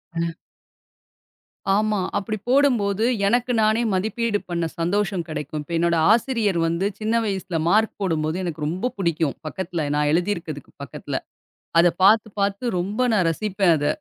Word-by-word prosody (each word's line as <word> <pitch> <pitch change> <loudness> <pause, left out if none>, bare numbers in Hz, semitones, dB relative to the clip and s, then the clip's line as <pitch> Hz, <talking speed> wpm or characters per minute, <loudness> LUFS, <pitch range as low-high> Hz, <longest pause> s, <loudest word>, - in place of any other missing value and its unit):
அ. 165 0 -2 1.4
ஆமா. 215 -1 +1 0.2
அப்டி 215 +2 -3
போடும்போது, 230 -7 +3 0.2
எனக்கு 245 +3 +1
நானே 220 +2 +3
மதிப்பீடு 220 +2 0
பண்ண 170 -1 -1
சந்தோஷம் 190 0 0
கிடைக்கும். 155 0 -4
இப்ப 170 - -8
என்னோட 170 0 +2 0.2
ஆசிரியர் 220 -6 +2
வந்து 170 +4 0
சின்ன 220 +2 0
வயசுல 190 -4 -2
மார்க் 215 +3 +3
போடும்போது 160 -2 0
எனக்கு 155 -3 -3
ரொம்ப 185 +10 -2
புடிக்கும். 165 -6 0
பக்கத்துல, 170 -1 -3
நான் 150 0 +2
எழுதிருக்குதுக்கு 170 -4 -2
பக்கத்துல 135 - -5 0.6
அத 175 - +7
பாத்து 215 +3 +5
பாத்து 200 +4 0
ரொம்ப 200 +6 -2 0.3
ரசிப்பேன் 190 +1 +1
அத. 145 - -1
190 Hz, 135 wpm, -23 LUFS, 170-215 Hz, 1.4 s, அத